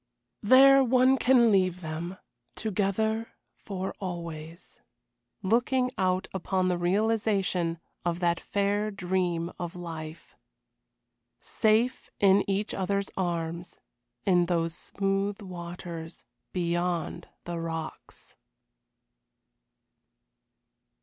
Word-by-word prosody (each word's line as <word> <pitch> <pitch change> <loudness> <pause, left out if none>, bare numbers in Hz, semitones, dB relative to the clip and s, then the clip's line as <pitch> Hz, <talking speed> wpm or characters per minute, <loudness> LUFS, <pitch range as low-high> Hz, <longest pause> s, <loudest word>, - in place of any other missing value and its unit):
There 270 +4 +7
one 255 +1 +4
can 250 -3 +5
leave 185 -2 +2
them 165 +3 -5 0.4
together 220 +2 -1 0.2
for 190 -2 -4
always 170 -3 -7 0.6
looking 250 +5 +2
out 185 -2 0
upon 185 0 0
the 180 - +1
realization 195 -3 +1 0.2
of 175 0 -1
that 170 -1 +1
fair 205 +1 0
dream 180 -3 -1
of 175 -1 -5
life. 165 -2 -8 1.0
Safe 225 +3 +1
in 200 0 +5
each 200 +2 0
other's 200 +1 -1
arms, 170 -1 -3 0.5
in 175 -3 +4
those 165 -2 0
smooth 195 +2 -1
waters, 170 -3 -7 0.3
beyond 175 -1 -1 0.2
the 175 -1 -4
rocks. 165 -1 -6
185 Hz, 90 wpm, -28 LUFS, 170-205 Hz, 1.0 s, There